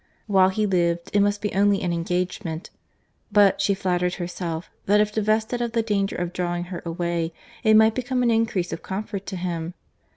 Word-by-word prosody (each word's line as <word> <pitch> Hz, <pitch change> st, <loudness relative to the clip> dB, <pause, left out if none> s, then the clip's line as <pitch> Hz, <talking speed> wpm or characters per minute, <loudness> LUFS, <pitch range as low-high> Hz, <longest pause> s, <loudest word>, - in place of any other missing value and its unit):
While 190 Hz, -3 st, +4 dB
he 210 Hz, +3 st, 0 dB
lived, 170 Hz, -3 st, 0 dB
it 205 Hz, -, +4 dB
must 205 Hz, 0 st, +1 dB
be 210 Hz, -, -1 dB
only 200 Hz, 0 st, +3 dB
an 175 Hz, -1 st, 0 dB
engagement; 175 Hz, 0 st, -3 dB, 0.6 s
but 200 Hz, -1 st, +5 dB
she 200 Hz, 0 st, +2 dB
flattered 180 Hz, -2 st, 0 dB
herself, 175 Hz, -2 st, -5 dB, 0.2 s
that 205 Hz, +1 st, +5 dB
if 210 Hz, 0 st, +2 dB
divested 220 Hz, +3 st, 0 dB
of 235 Hz, -1 st, -2 dB
the 230 Hz, -1 st, +1 dB
danger 200 Hz, -3 st, 0 dB
of 175 Hz, 0 st, -3 dB
drawing 175 Hz, -1 st, -2 dB
her 170 Hz, -, -5 dB
away, 170 Hz, -1 st, -2 dB, 0.3 s
it 220 Hz, -1 st, +5 dB
might 220 Hz, 0 st, +6 dB
become 250 Hz, +1 st, -1 dB
an 235 Hz, -, +3 dB
increase 225 Hz, -7 st, 0 dB
of 165 Hz, -, -5 dB
comfort 200 Hz, 0 st, -5 dB
to 190 Hz, -, -4 dB
him. 175 Hz, -1 st, -4 dB
190 Hz, 190 wpm, -24 LUFS, 175-210 Hz, 0.6 s, might